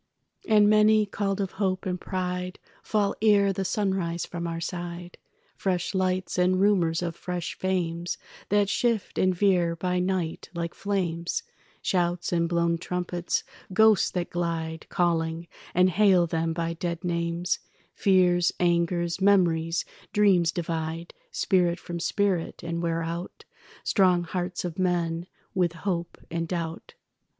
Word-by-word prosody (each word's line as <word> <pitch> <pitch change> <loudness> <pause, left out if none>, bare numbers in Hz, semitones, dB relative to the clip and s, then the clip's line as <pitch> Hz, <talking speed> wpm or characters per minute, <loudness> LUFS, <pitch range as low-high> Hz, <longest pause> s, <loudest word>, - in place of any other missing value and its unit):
And 210 -1 +6
many, 215 0 +5
called 200 0 -2
of 195 -2 -1
hope 190 -1 -1
and 180 -1 -2
pride, 180 -1 -3 0.2
Fall 205 -2 +1
ere 200 -2 +4
the 195 - -2
sunrise 190 -4 -1
from 170 -1 -5
our 165 0 -3
side. 175 +1 -6 0.4
Fresh 180 -1 -1
lights 185 -1 0
and 185 +1 +3
rumours 180 -4 +3
of 170 -2 -3
fresh 180 -1 -4
fames 175 -2 -1 0.3
That 205 0 +3
shift 230 0 0
and 185 -1 +3
veer 175 -3 +2
by 180 +1 -1
night 180 -3 -2
like 170 0 -3
flames, 175 -4 -2 0.4
Shouts 175 -1 0
and 170 -1 +1
blown 170 -1 +1
trumpets, 175 0 -2 0.3
ghosts 220 -1 +5
that 175 -1 -3
glide 165 -2 -3
Calling, 170 -2 0 0.3
and 180 +1 +5
hail 190 -3 +5
them 165 0 -1
by 165 0 -2
dead 170 +1 -4
names, 170 0 -1 0.3
Fears, 180 -2 +3
angers, 170 0 +1
memories, 175 -4 +3 0.3
dreams 190 -5 +4
divide 165 0 -3 0.2
Spirit 175 -2 +1
from 175 0 -6
spirit, 190 -1 0
and 170 0 -3
wear 165 -1 0
out 170 +2 -6 0.4
Strong 180 -3 +3
hearts 180 +1 -3
of 175 0 -5
men 175 -2 0 0.3
with 175 -3 +1
hope 170 -1 -3
and 165 0 -2
doubt. 165 -2 -4
175 Hz, 135 wpm, -27 LUFS, 170-190 Hz, 0.4 s, And